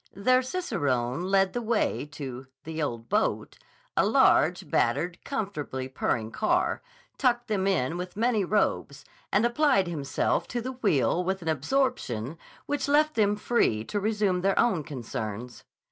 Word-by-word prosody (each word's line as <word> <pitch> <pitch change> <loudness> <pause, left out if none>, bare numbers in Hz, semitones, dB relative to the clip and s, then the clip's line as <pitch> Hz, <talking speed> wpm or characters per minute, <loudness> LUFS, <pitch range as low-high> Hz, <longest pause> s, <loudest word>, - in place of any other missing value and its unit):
Their 255 +6 +3
cicerone 170 - -1
led 195 0 +2
the 245 - -2
way 225 -9 0
to 130 -3 -7 0.2
"the 160 0 -5
ole 130 -6 -1
boat," 115 0 -1 0.4
a - - +4
large, - - +3
battered, 160 +9 0
comfortably 180 - -4
purring 115 -3 -1
car, 215 - +1 0.4
tucked 240 -2 +2
them 195 -3 0
in 170 -4 +1
with 180 +2 -6
many 225 -2 +2
robes, 160 -7 0 0.3
and 210 +4 +3
applied 250 -4 +3
himself 145 -6 -1
to 245 - -3
the 255 +3 -4
wheel 180 - +1
with 190 0 -2
an 165 - -2
absorption 160 - -1 0.3
which 285 -1 -2
left 305 +2 +3
them 205 -2 +2
free 205 - +1
to 205 - -3
resume 205 -3 0
their 195 +1 +1
own 190 -10 +2
concerns. 120 -4 -6
190 Hz, 145 wpm, -27 LUFS, 140-235 Hz, 0.4 s, a